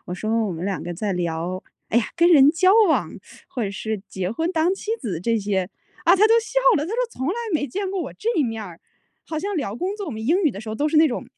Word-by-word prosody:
我 180 - -4
说： 220 +4 0
“我 190 - -3
们 165 +2 -5
两 195 -2 -2
个 175 - -5
在 200 +3 -2
聊 175 +1 -3 0.3
哎 235 - +3
呀， 225 - 0
跟 340 +1 +5
人 290 -4 +7
交 370 +4 +4 0.2
往， 315 - +2 0.4
或 245 - -4
者 200 - -2
是 215 +1 -4
结 185 0 -3
婚 325 +9 -1
当 335 +3 +2
妻 425 - -6
子 185 -9 -4
这 230 +4 +1
些 195 -3 -1 0.4
啊。” - - +4
啊 - - +6
他 425 - +6
都 455 - +5
笑 - - -1 0.2
了， 295 - 0
他 - - -6
说 - - -2 0.2
从 260 +4 -3
来 370 - 0 0.2
没 295 - +1
见 395 +4 -3
过 390 - -2
我 - - -7
这 440 - -5
一 305 - +3
面 225 -3 -3
儿。 175 -3 -11 0.5
好 315 - -3
像 400 +3 -3
聊 215 -9 -2
工 370 +8 -2
作， 405 -3 -5
我 - - -4
们 220 0 -6
英 360 +8 +3
语 300 - +4
的 200 - -7
时 220 - -9
候 215 - -3
都 295 +5 +1
是 310 - 0
那 315 +1 +7
种 250 - -4
245 Hz, 305 characters per minute, -23 LUFS, -, 0.5 s, 人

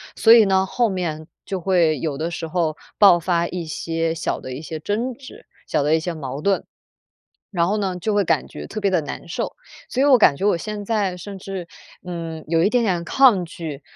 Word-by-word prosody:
所 225 - +7
以 230 -2 +7
呢， 190 -1 +3
后 235 +4 +1
面 165 -5 -3 0.2
就 190 -2 -3
会 170 -5 +2
有 145 0 -3
的 160 +3 -2
时 165 - -4
候 160 -2 -1 0.2
爆 195 -4 +7
发 170 0 0
一 175 -1 -5
些 165 +1 -2
小 165 - -2
的 130 - -7
一 130 - -6
些 160 0 -6
争 225 +10 -2
执， 280 - -13 0.2
小 145 - +1
的 150 +2 +2
一 - - +2
些 170 +1 -4
矛 140 -2 -6
盾。 195 +3 +1 0.9
然 170 -4 +1
后 205 +4 0
呢， 190 -3 -1
就 210 +4 -1
会 205 -1 +3
感 - - +1
觉 - - -9
特 215 - -6
别 200 -1 +1
地 180 -3 +2
难 145 - -7
受， 170 - -4 0.3
所 260 - 0
以 - - +4
我 270 -3 +7
感 145 -10 +5
觉 190 - -4
我 205 -4 +3
现 210 +3 -5
在 200 -4 0
甚 195 +2 -8
至， 190 -2 -6 0.4
嗯， 165 -3 -6
有 165 +1 +2
一 195 - +3
点 245 -1 +2
点 180 -5 0
抗 225 -2 +4
拒， 160 -4 -7
180 Hz, 240 characters per minute, -22 LUFS, 160-205 Hz, 0.9 s, 所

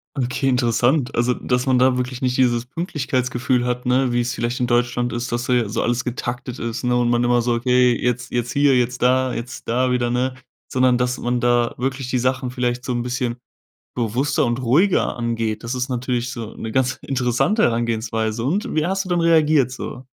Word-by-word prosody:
Okay, 135 +1 -1
interessant. 125 +2 +1
Also, 120 +2 +2
dass 125 0 -1
man 130 -1 +3
da 130 0 +4
wirklich 125 0 -3
nicht 125 -1 0
dieses 120 -2 +2
Pünktlichkeitsgefühl 130 -4 -1
hat, 125 0 -2
ne, 125 0 +2
wie 120 - +1
es 120 +1 -1
vielleicht 120 +1 -2
in 125 - 0
Deutschland 120 0 0
ist, 120 +1 -3
dass 120 +1 -1
da 125 - +1
ja 120 -4 +1
so 105 - -1
alles 120 +1 0
getaktet 125 +1 -4
ist, 115 -1 -4
ne, 125 0 +2
und 120 -1 +2
man 120 0 +2
immer 120 0 +3
so: 120 0 0
„Okay, 125 0 +3
jetzt 125 0 -2
jetzt 120 0 -2
hier, 140 0 +3
jetzt 125 0 -1
da, 130 +1 +2
jetzt 120 +1 -7
da 125 +2 +2
wieder“, 120 -1 +1
ne? 125 +2 -1 0.3
Sondern, 130 -1 +2
dass 125 +1 0
man 120 0 -1
da 120 0 +2
wirklich 130 0 -3
die 125 - 0
Sachen 130 0 -1
vielleicht 125 -1 -2
so 125 - -3
'n 120 -1 -1
bisschen 125 -1 -2 0.6
bewusster 125 +4 0
und 120 +2 -1
ruhiger 150 +11 +2
angeht. 115 -2 -2
Das 115 +3 -3
ist 125 +1 -2
natürlich 125 -1 -2
so 115 -4 -7
'ne 110 - -6
ganz 130 +2 +1
interessante 130 - +1
Herangehensweise. 115 -1 0
Und 170 - -1
wie 155 -1 +1
hast 190 +3 -1
du - - -8
dann 175 -1 +1
reagiert 155 -5 +4
so? 130 0 -7
125 Hz, 210 wpm, -21 LUFS, 120-130 Hz, 0.6 s, da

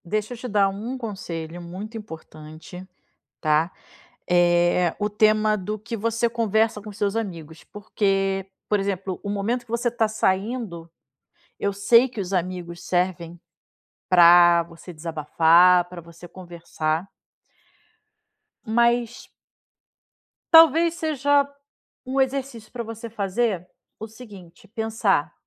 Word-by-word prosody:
Deixa 215 +6 -2
eu - - -9
te 250 - -7
dar 205 -3 +2
um 220 +7 -5
conselho 175 -7 -6
muito 190 +6 -8
importante, 160 -2 -10 0.5
tá, 155 +2 +2 0.6
eh, 175 0 +3
o 210 0 0
tema 215 0 +3
do 210 +2 -5
que 230 +3 -6
você 230 +2 0
conversa 225 -1 0
com 210 +1 -9
seus 200 0 -2
amigos 165 -8 -6
porque, 195 -2 -1 0.2
por 210 - +2
exemplo, 195 -2 -3
o 205 - -4
momento 210 +5 -2
que 235 - -16
você 235 +1 -1
está 235 -1 +1
saindo, 195 -4 -2 0.7
eu 200 - 0
sei 230 +6 +4
que 235 - -9
os 190 -1 -4
amigos 175 -1 -3
servem 175 -2 -2 0.7
pra 175 -1 +7
você 165 +2 -13
desabafar, 165 +3 +4
para 180 -1 -8
você 170 +1 -14
conversar 170 -2 -4 1.6
mas 235 +1 +1 1.3
talvez 330 +1 +7
seja 285 -3 +1 0.6
um 260 +2 -2
exercício 265 -4 -2
para 240 -1 -4
você 225 +1 -8
fazer 200 -2 -1 0.3
o 220 - -7
seguinte, 210 -3 -14
pensar, 215 - -1
200 Hz, 120 wpm, -23 LUFS, 175-230 Hz, 1.6 s, pra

